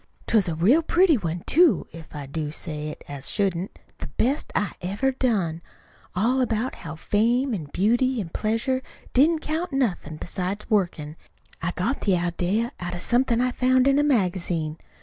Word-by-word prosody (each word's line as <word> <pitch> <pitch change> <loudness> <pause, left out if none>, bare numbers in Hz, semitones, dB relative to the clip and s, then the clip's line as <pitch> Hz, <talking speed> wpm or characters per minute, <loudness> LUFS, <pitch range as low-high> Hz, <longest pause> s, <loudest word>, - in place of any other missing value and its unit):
'T - - -1
was 205 -4 +4
a 165 - -1
real 215 - +4
pretty 340 +1 +4
one, 175 -6 -3
too, 340 0 +4
if 160 -1 -11
I 145 -1 -5
do 150 +2 -3
say 150 0 -5
it 150 - -8
as 140 -1 -5
shouldn't 190 -2 -1 0.2
the - - -5
best 270 +5 0
I 205 - +1
ever 200 +9 0
done; 200 -11 0 0.5
all 240 +8 +2
about 240 +1 0
how 160 -3 -8
fame 235 - +1
an' 175 -8 -3
beauty 240 +6 +2
an' 185 -6 -4
pleasure 230 +7 -1 0.3
didn't 310 +5 +4
count 320 +4 -2
nothin' 195 - -1
beside 185 +5 -4
workin'. 165 -7 0 0.4
I 165 - 0
got 225 +10 -1
the 195 -3 +2
idea 180 +7 0
out 175 0 -4
of 175 - -5
something 240 -1 +2
I 250 0 +2
found 255 +1 +3
in 275 +1 +4
a - - +3
magazine. 180 - 0
205 Hz, 175 wpm, -25 LUFS, 170-255 Hz, 0.5 s, was